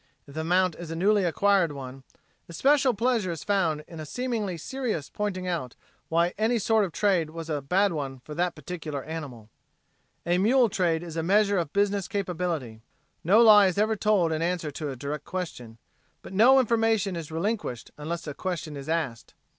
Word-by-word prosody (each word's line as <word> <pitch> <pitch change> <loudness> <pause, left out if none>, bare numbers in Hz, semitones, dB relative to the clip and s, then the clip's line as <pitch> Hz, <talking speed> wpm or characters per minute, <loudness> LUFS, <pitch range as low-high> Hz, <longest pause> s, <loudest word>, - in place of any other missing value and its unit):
If 140 - -14
the 160 +1 -3
mount 180 +1 +2
is 175 -2 -8
a 165 - -4
newly 200 +3 +3
acquired 185 -2 +2
one, 135 -1 -8 0.5
especial 265 - +3
pleasure 230 -3 +1
is 165 -3 -5
found 170 -7 0
in 165 - -10
a 155 - -6
seemingly 220 - -3
serious 220 - -4
pointing 185 -3 -3
out 160 -9 -3 0.3
why 170 +2 +2
any 225 +2 +2
sort 220 0 +2
of 180 - -6
trade 180 -3 +1
was 165 0 -7
a 145 -2 -1
bad 185 +7 +2
one 135 -4 -4
for 150 - -9
that 175 +2 -1
particular 155 -2 -6
animal. 135 -9 -7 0.7
A 175 +1 +2
mule 240 +4 +4
trade 170 -4 0
is 165 -2 -7
a - - +1
measure 200 +3 +3
of 165 -4 -3
business 200 -1 +1
capability. 170 - -3 0.4
No 200 +7 +5
lie 210 -3 +8
is 185 - -2
ever 215 +2 +2
told 200 -6 +2
in 160 0 -1
answer 170 -3 -1
to 150 +1 -5
a 135 - -5
direct 145 +3 -5
question, 125 -11 -6 0.5
but - - -10
no 245 +7 +6
information 225 -5 +1
is 165 -3 -6
relinquished 170 - -3
unless 165 +2 -5
a 150 - -5
question 170 -3 -4
is 140 +1 -8
asked. 150 -9 -3
175 Hz, 185 wpm, -26 LUFS, 155-205 Hz, 0.7 s, lie